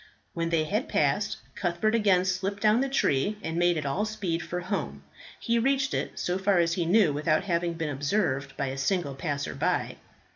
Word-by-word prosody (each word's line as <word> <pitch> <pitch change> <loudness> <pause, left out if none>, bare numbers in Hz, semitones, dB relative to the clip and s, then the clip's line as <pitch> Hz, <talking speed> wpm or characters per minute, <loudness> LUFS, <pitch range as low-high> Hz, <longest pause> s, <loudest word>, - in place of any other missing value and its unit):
When 165 0 -1
they 165 -2 +2
had 210 - -2
passed, - - +1 0.2
Cuthbert 180 +4 0
again 200 -5 +3
slipped 190 +2 -1
down 215 +3 +4
the 275 - 0
tree 205 - +1
and 160 - -3
made 175 -1 +3
at 150 - -3
all 140 +9 0
speed 205 -6 -2
for 180 0 -4
home. 190 +3 -4 0.4
He 235 0 +1
reached 270 +2 +1
it, - - -3
so 180 +1 -1
far 195 0 +2
as 170 -1 +2
he 170 -1 -1
knew 185 -4 +4
without 155 +3 +1
having 170 -2 0
been 165 -2 -3
observed 145 0 -1
by 140 -2 -1
a 135 +1 -5
single 170 -1 0
passer 140 +1 -3
by. - - -1
175 Hz, 195 wpm, -27 LUFS, 155-205 Hz, 0.4 s, down